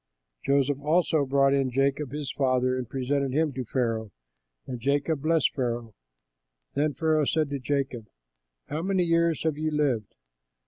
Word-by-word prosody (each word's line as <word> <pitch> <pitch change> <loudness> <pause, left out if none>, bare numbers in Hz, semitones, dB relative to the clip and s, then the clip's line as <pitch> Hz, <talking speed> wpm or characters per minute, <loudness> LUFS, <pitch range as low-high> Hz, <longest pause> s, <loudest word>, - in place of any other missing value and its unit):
Joseph 140 0 +2
also 155 -1 +2
brought 135 0 +3
in 135 -2 +2
Jacob 135 +1 0
his 145 -2 -4
father 130 -2 +1
and 125 -3 -4
presented 135 +1 -1
him 155 0 +1
to 130 0 -3
Pharaoh; 115 -3 -1 0.6
and 125 -2 -5
Jacob 140 +4 0
blessed 160 0 +2
Pharaoh. 120 -4 -3 0.8
Then 145 -1 0
Pharaoh 155 0 +2
said 155 0 0
to 140 - -2
Jacob, 130 -4 -2 0.6
"How 150 +2 -3
many 190 0 +1
years 165 -1 +2
have 155 -2 -1
you 155 0 0
lived?" 140 -9 -1
140 Hz, 150 wpm, -27 LUFS, 130-155 Hz, 0.8 s, brought